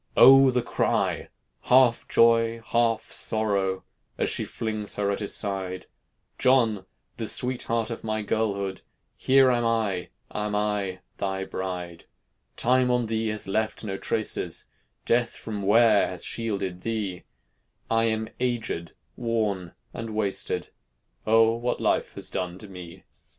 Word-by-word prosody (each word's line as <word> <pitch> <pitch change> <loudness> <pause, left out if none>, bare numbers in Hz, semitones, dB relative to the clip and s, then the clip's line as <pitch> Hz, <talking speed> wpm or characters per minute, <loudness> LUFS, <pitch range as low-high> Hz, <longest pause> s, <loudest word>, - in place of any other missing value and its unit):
O! 135 +1 +9
the 125 -1 +1
cry, - - 0 0.4
half 125 -2 +4
joy, 115 0 +4
half 115 -1 +1
sorrow, 100 -4 0 0.3
As - - +1
she - - -1
flings 110 -2 -3
her 100 -1 0
at 100 - -2
his 105 - -1
side: 95 -3 -2 0.5
"John! 115 -7 +3 0.3
the 110 - -2
sweetheart 115 -2 0
of 115 - -6
my 110 -1 -2
girlhood, 100 -3 -1 0.3
Here 135 0 +4
am 120 -1 +1
I, 110 -6 0 0.2
am 105 0 -2
I, 105 -3 -1 0.2
thy 95 -1 -2
bride. 90 -3 -5 0.5
"Time 125 +1 +3
on 125 -1 +2
thee 110 0 -1
has 110 -1 -3
left 110 +4 -1
no 100 -3 -3
traces, - - -1 0.4
Death 120 0 +1
from 105 -2 -6
wear 105 +1 +5
has 90 -2 -3
shielded 100 -6 -3
thee; 105 -5 -3 0.6
I 115 0 +2
am 110 -1 -1
agéd, 115 -9 -2 0.2
worn, 105 -7 -2 0.2
and 115 -2 -6
wasted, 100 -3 -1 0.6
O! 115 +1 +5
what 120 +1 -2
life - - 0
has 95 -1 -5
done 90 -1 -3
to 105 - -11
me!" 90 -3 -11
110 Hz, 135 wpm, -26 LUFS, 95-115 Hz, 0.6 s, O